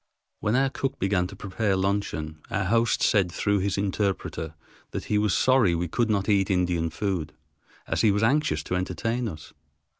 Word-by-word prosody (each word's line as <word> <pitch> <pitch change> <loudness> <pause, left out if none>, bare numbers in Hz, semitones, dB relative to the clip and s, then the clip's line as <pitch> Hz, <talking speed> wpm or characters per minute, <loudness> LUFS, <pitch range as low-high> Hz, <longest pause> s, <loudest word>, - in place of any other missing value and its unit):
When 105 +3 0
our 135 +1 +2
cook 135 -1 -3
began 95 -2 +1
to 100 - -10
prepare 100 +1 -1
luncheon 95 -5 -2
our 100 - 0
host 115 +4 +2
said 95 -4 +3
through 100 +3 +1
his 100 0 -1
interpreter 95 -5 -2 0.4
that - - -3
he 105 - +1
was 105 -2 +2
sorry 130 -9 +4
we 85 +1 -1
could 115 +7 0
not 100 -2 +1
eat 100 -3 +3
Indian 90 -3 +1
food, 95 -4 -3 0.5
as - - 0
he 110 - +5
was 105 +2 +1
anxious 150 +7 +2
to 90 - -2
entertain 115 +7 -1
us. 80 -4 -10
100 Hz, 180 wpm, -26 LUFS, 90-110 Hz, 0.5 s, he